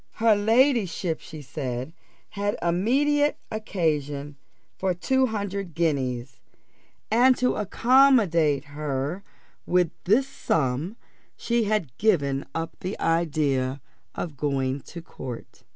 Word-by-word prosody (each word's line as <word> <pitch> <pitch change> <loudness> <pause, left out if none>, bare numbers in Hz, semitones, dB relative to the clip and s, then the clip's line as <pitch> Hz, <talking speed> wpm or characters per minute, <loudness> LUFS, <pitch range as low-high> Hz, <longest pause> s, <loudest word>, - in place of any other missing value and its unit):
"Her 225 -1 +4
ladyship," 215 - +2
she 155 -2 -10
said, 130 0 -4 0.4
"had 205 0 -2
immediate 275 +12 +2
occasion 150 -9 -2 0.4
for 185 -2 -1
two 265 +8 +2
hundred 200 -5 -4
guineas, 130 -6 -1 0.7
and 250 +3 +5
to 250 - +2
accommodate 210 - +4
her 145 +4 -3 0.5
with 180 -2 +2
this 230 +9 +3
sum 155 - -1 0.4
she 235 -1 0
had 200 - -1
given 145 -10 +1
up 165 0 -4
the 185 +3 -5
idea 145 -5 +1 0.4
of 160 -4 -4
going 135 -1 -1
to 170 -1 -8
court." 125 -7 -9
170 Hz, 105 wpm, -25 LUFS, 145-215 Hz, 0.7 s, and